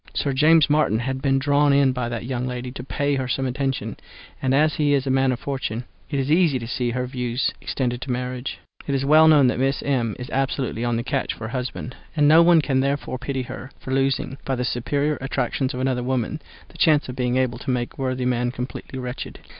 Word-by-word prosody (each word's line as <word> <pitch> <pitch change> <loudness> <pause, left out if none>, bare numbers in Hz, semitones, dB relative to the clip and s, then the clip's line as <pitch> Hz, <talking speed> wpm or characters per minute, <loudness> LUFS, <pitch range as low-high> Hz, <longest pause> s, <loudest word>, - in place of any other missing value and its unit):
Sir 140 - 0
James 155 +3 +5
Martin 150 -7 +2
had 130 +3 -3
been 135 -1 +2
drawn 145 +1 +3
in 140 -1 +4
by 125 -2 -2
that 120 -1 -4
young 125 0 -2
lady 125 0 -4
to 125 - -7
pay 145 +2 -1
her 130 -1 -2
some 135 +2 -1
attention; 135 +1 -2 0.4
and 130 - +1
as 150 +3 +3
he 145 -2 +2
is 135 -1 0
a 135 - 0
man 135 0 +3
of 125 - -3
fortune, 130 -4 -3 0.3
it 145 - -2
was 135 +1 0
easy 160 -4 +4
to 115 - -6
see 120 +1 -1
her 125 +1 -2
views 125 -1 -1
extended 125 -2 -2
to 135 - -6
marriage. 125 +1 -3 0.3
It 140 - 0
is 135 0 0
well 155 +2 +7
known 150 -3 +6
that 125 - +1
Miss 135 +1 0
M. 120 -6 0
is 125 - -7
absolutely 130 -3 -1
on 120 -1 0
the 115 - -1
catch 135 +1 -1
for 110 - -7
a 110 - -6
husband, 125 0 -4 0.2
and 150 -2 +4
no 160 +3 +8
one 170 -1 +6
therefore 135 -1 0
can - - -11
pity 135 -2 -1
her 130 +1 -8
for 130 - -5
losing, 135 0 0
by 135 - -1
the 125 0 -2
superior 145 +5 -1
attractions 135 0 -1
of - - -4
another 130 -1 0
woman, 130 +4 -2 0.3
the - - -16
chance 150 -2 +4
of 125 - -6
being 125 -1 0
able 125 -2 0
to - - -6
make 125 -1 -1
a - - -9
worthy 130 -1 -1
man 125 -1 +1
completely 125 +2 -6
wretched. 125 0 -6
130 Hz, 235 wpm, -23 LUFS, 125-140 Hz, 0.4 s, no